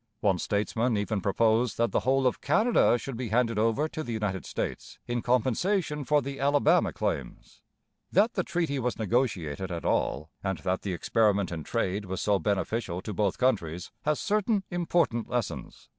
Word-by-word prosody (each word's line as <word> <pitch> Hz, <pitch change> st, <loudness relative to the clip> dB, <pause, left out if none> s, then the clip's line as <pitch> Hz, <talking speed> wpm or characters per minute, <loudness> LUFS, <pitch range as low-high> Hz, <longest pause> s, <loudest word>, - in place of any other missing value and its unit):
One 95 Hz, -4 st, +2 dB
statesman 110 Hz, +4 st, 0 dB
even 105 Hz, 0 st, -1 dB
proposed 110 Hz, +3 st, +2 dB
that 115 Hz, 0 st, +1 dB
the -, -, +2 dB
whole 135 Hz, +1 st, +1 dB
of 125 Hz, -, +1 dB
Canada 195 Hz, -, +3 dB
should 125 Hz, +2 st, -6 dB
be 120 Hz, -1 st, -4 dB
handed 115 Hz, -1 st, +1 dB
over 115 Hz, +7 st, +2 dB
to 155 Hz, -, -5 dB
the 135 Hz, -, -5 dB
United 105 Hz, -4 st, -2 dB
States -, -, -4 dB
in 120 Hz, 0 st, -2 dB
compensation 145 Hz, -, 0 dB
for 150 Hz, +1 st, +3 dB
the 140 Hz, +1 st, -5 dB
Alabama 140 Hz, -3 st, +3 dB
claims. -, -, -4 dB, 0.5 s
That 215 Hz, +5 st, +3 dB
the 185 Hz, -, 0 dB
treaty 165 Hz, -6 st, -1 dB
was 125 Hz, -1 st, -1 dB
negotiated 95 Hz, -, -1 dB
at 85 Hz, -1 st, -4 dB
all, 75 Hz, +4 st, 0 dB
and 95 Hz, -1 st, -1 dB
that 95 Hz, -1 st, -2 dB
the 95 Hz, -, -3 dB
experiment 100 Hz, 0 st, +1 dB
in 80 Hz, -2 st, -4 dB
trade 100 Hz, -1 st, -1 dB
was 95 Hz, 0 st, -4 dB
so 100 Hz, -2 st, +2 dB
beneficial 100 Hz, -2 st, -1 dB
to 105 Hz, -, -5 dB
both 100 Hz, -1 st, 0 dB
countries, 90 Hz, -10 st, 0 dB
has 150 Hz, 0 st, 0 dB
certain 210 Hz, -1 st, +1 dB
important 170 Hz, -9 st, 0 dB
lessons. 120 Hz, -3 st, -4 dB
115 Hz, 175 wpm, -28 LUFS, 100-140 Hz, 0.5 s, Canada